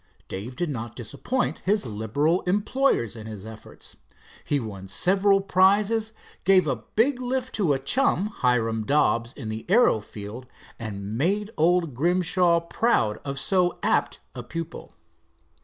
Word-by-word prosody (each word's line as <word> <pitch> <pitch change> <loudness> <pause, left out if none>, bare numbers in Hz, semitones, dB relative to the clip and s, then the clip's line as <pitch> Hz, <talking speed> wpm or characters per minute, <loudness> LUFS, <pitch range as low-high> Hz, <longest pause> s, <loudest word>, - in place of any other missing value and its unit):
Dave 110 +7 -6
did 175 0 -2
not 115 -3 -6
disappoint 240 - -3
his 205 -1 0
liberal 120 - 0
employers 205 - +1
in 110 -1 -9
his 105 -2 -8
efforts. 110 0 -11 0.5
He 145 - 0
won 100 -5 -7
several 195 - +3
prizes, 205 +4 +3 0.3
gave 185 -2 +5
a 135 -5 0 0.2
big 255 +3 +2
lift 255 +1 -2
to 180 -9 +2
a - - +1
chum, 195 - +1
Hiram 115 - 0
Dobbs, 120 -3 +1
in 110 - -7
the 110 +1 -5
aero 220 - +5
field, 105 +4 -9 0.3
and 105 -2 -5
made 205 +7 0
old 170 -1 +2
Grimshaw 175 +3 +2
proud 170 - +1
of 140 -1 -4
so 180 -2 +1
apt - - +1
a - - -6
pupil. 165 0 -7
165 Hz, 140 wpm, -25 LUFS, -, 0.5 s, gave